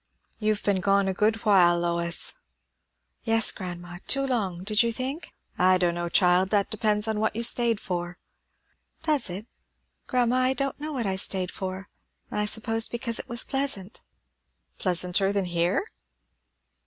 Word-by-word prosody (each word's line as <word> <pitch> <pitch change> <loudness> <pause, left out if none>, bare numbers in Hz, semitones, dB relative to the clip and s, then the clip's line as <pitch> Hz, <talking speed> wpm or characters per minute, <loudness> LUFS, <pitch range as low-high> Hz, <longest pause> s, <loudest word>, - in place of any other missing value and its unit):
"You've 215 -1 0
been 200 -2 +1
gone 195 +1 +2
a 190 - 0
good 215 +3 0
while, 180 -4 +5
Lois!" 170 0 0 0.9
"Yes, 225 -2 +3
grandma. 175 -2 -8
Too 275 0 +2
long, 195 -9 -2
did 210 +2 +3
you 235 -1 +1
think?" 265 +7 -5 0.3
"I 185 +1 +5
don' 175 -2 +1
know, 175 0 -3
child. 180 +1 +3
That 200 -1 +1
depends 210 0 +1
on 220 -1 -1
what 220 0 0
you 230 - -2
stayed 235 -2 +2
for." 175 -1 -4 0.9
"Does 300 - +2
it? 190 +4 -6 0.6
Grandma, 250 0 +2
I 255 +1 +3
don't 275 +1 -3
know 305 +1 -5
what 255 -6 -3
I 190 -1 -1
stayed 185 -1 +1
for. 190 +1 -5 0.4
I 210 - 0
suppose 225 +1 +1
because 235 -1 -1
it - - -5
was 235 0 +2
pleasant." 265 -7 -2 0.8
"Pleasanter 180 +1 +1
than 200 -2 0
here?" 175 - 0
205 Hz, 155 wpm, -26 LUFS, 180-230 Hz, 0.9 s, while